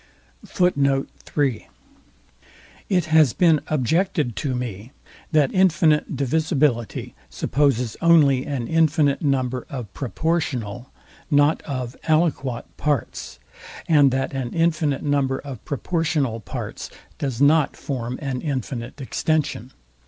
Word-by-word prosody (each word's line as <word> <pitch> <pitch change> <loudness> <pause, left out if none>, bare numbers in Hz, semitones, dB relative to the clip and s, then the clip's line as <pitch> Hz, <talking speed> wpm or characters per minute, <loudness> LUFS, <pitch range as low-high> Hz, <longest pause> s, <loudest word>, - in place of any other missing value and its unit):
It 180 -4 +2
has 155 -5 +4
been 165 -4 +4
objected 155 - 0
to 135 -4 -1
me, 120 -2 -5 0.4
that 150 -4 +3
infinite 165 -5 +3
divisibility 140 - 0 0.2
supposes 125 - 0
only 150 -6 +5
an 135 -5 -3
infinite 155 -3 +2
number 130 -3 -1
of 120 -7 -7
PROPORTIONAL 130 - -2 0.4
not 145 +1 +3
of 130 -3 -4
ALIQIOT 150 -6 +1
parts, 145 - -2 0.5
and 145 -4 +5
that 130 +1 -2
an 130 -3 -4
infinite 165 -4 +1
number 140 -2 +1
of 135 -5 -8
proportional 150 -5 -1
parts 105 - -6 0.3
does 130 -5 -3
not 145 +1 +3
form 125 -3 -4
an 130 -2 -3
infinite 130 - -4
extension. 140 -2 -1
140 Hz, 100 wpm, -22 LUFS, 125-155 Hz, 0.5 s, only